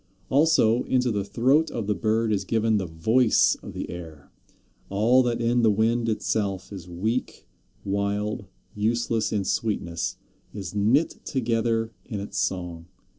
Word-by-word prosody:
Also, 135 -6 +4
into 125 -1 +1
the 100 -2 -1
throat 135 +10 +2
of 115 - -4
the 105 - +1
Bird 110 +4 +1
is 100 -1 0
given 110 +1 +1
the 95 -3 -2
voice 110 +9 +3
of - - -9
the - - -5
air. 80 -4 -10 0.6
All 115 +6 +4
that 120 -2 0
in 120 +1 +2
the 115 - +5
wind 115 +3 +1
itself 100 -3 -2
is 90 -3 -9
weak, 110 +8 -3 0.4
wild, 100 +1 -2 0.3
useless 115 +1 0
in 100 -3 -1
sweetness, 85 -6 -2 0.4
is 95 -4 -6
knit 115 +10 +2
together 115 -2 0
in 105 - -5
its 100 - -4
song. 85 -3 -3
110 Hz, 145 wpm, -25 LUFS, 100-115 Hz, 0.6 s, the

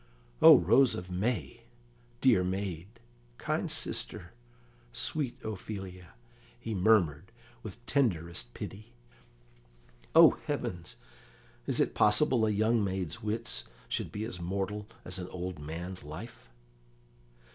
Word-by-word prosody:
"O - - +10
rose 135 -3 +4
of 90 0 -7
May! 115 +5 -2 0.6
Dear 120 -8 +5
maid, 95 -2 -3 0.5
kind - - -2
sister, - - -3 0.6
sweet 135 -5 -3
Ophelia!" 95 -4 -7 0.4
he 115 - -4
murmured, 95 -3 +2 0.3
with 115 +3 -10
tenderest 85 - 0
pity. 110 +4 -8 1.2
"Oh - - +10 0.2
heavens! 90 -1 -4 0.7
is - - 0
it - - +2
possible 110 +2 +4
a - - +2
young 110 +2 +2
maid's 95 -4 -3
wits 110 +2 -3 0.2
should - - -3
be 105 - -4
as 90 -6 -6
mortal 100 +4 -3 0.2
as 90 +1 -4
an 90 - -5
old 90 -2 -5
man's 85 +4 -6
life?" 75 - -9
95 Hz, 115 wpm, -30 LUFS, 90-110 Hz, 1.2 s, O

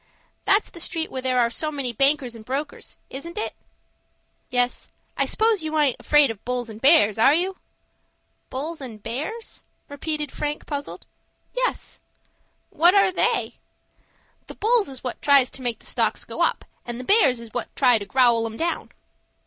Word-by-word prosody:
"That's 405 +2 +3
the 340 - -11
street 330 -1 -3
where 260 - -4
there 255 -1 0
are 235 -1 +2
so 305 +5 -3
many 270 -5 -2
bankers 275 0 +2
and 225 -2 -11
brokers,—isn't 285 - -6
it?" 430 - -2 1.0
"Yes, 245 0 0 0.3
I - - +1
s'pose 440 -3 +2
you 315 0 -2
aint 290 -5 +3
afraid 295 -4 +4
of 220 -2 -11
bulls 245 -2 -3
and 215 +1 -11
bears,—are 270 -3 +5
you?" 370 +3 0 0.9
"Bulls 300 +4 -5
and 225 -6 -9
bears?" 310 - -5 0.3
repeated 300 0 -3
Frank, 295 0 -3
puzzled. 285 -1 -5 0.5
"Yes." - - -2 0.7
"What 345 +5 +5
are 395 -2 +5
they?" - - 0 0.9
"The - - -10
bulls 445 -4 +2
is 265 -2 -10
what 250 - -5
tries 280 -3 +5
to 270 - -7
make 240 -3 -2
the - - -20
stocks - - -1
go - - -5
up, - - +1 0.2
and 240 0 -6
the - - -6
bears 275 - +4
is 230 -2 -11
what - - -3
try 250 -4 +4
to 200 - -6
growl 235 -2 +3
'em 225 0 -8
down." 340 +1 -2
275 Hz, 165 wpm, -23 LUFS, 245-325 Hz, 1.0 s, bears,—are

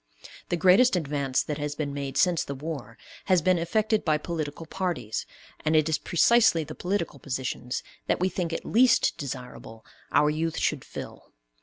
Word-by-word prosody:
The 175 - 0
greatest 190 +8 +5
advance 140 -5 0
that 150 0 -4
has 145 0 -3
been 145 -2 -3
made 140 -1 -4
since 180 -3 +3
the 140 - -6
War 135 -6 -6 0.3
has 185 -2 +4
been 185 0 +3
effected 215 +5 +1
by 155 -2 +2
political 155 0 -5
parties, 160 - -3 0.4
and 155 +1 +2
it 155 0 +4
is 160 - +1
precisely 175 -1 +4
the - - -8
political 180 -6 -2
positions 130 -1 -4 0.2
that - - +1
we 185 - +2
think 180 -3 -2
it - - -4
least 240 +1 +4
desirable 125 -4 -7 0.3
our 150 0 +4
youth 160 +1 -2
should 150 -5 0
fill. - - -9
155 Hz, 170 wpm, -27 LUFS, 140-180 Hz, 0.4 s, greatest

